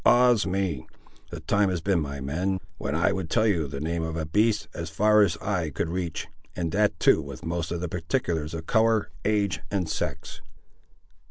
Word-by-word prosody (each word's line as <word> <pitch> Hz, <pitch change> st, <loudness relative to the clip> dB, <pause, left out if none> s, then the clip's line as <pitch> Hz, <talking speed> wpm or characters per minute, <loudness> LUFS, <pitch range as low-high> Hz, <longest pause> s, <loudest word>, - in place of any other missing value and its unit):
Ah's 120 Hz, -4 st, +5 dB
me! 90 Hz, -7 st, -1 dB, 0.4 s
The -, -, -7 dB
time 100 Hz, -1 st, +2 dB
has 90 Hz, -2 st, -1 dB
been, 95 Hz, +1 st, +1 dB
my 70 Hz, -1 st, -4 dB
men, 90 Hz, +8 st, -1 dB, 0.2 s
when 70 Hz, -, -2 dB
I 85 Hz, +5 st, +3 dB
would 95 Hz, -4 st, -3 dB
tell 110 Hz, +5 st, +3 dB
you 85 Hz, -8 st, +2 dB
the 70 Hz, 0 st, -5 dB
name 85 Hz, +3 st, -2 dB
of 80 Hz, 0 st, -3 dB
a 80 Hz, -, -2 dB
beast, 105 Hz, +6 st, +2 dB
as 85 Hz, -1 st, -5 dB
far 105 Hz, +6 st, +4 dB
as 90 Hz, -5 st, +3 dB
eye 90 Hz, -3 st, -1 dB
could 75 Hz, +3 st, -2 dB
reach, 85 Hz, -3 st, -3 dB, 0.3 s
and 85 Hz, -2 st, -2 dB
that 105 Hz, +3 st, +2 dB
too -, -, +5 dB
with 85 Hz, -, -9 dB
most 85 Hz, 0 st, -2 dB
of 85 Hz, -1 st, -2 dB
the 90 Hz, -, -2 dB
particulars 80 Hz, -1 st, -2 dB
of 80 Hz, 0 st, -6 dB
colour, 110 Hz, 0 st, +2 dB
age, 100 Hz, -3 st, +1 dB
and 95 Hz, -4 st, -1 dB
sex." -, -, -4 dB
85 Hz, 195 wpm, -26 LUFS, 80-100 Hz, 0.4 s, Ah's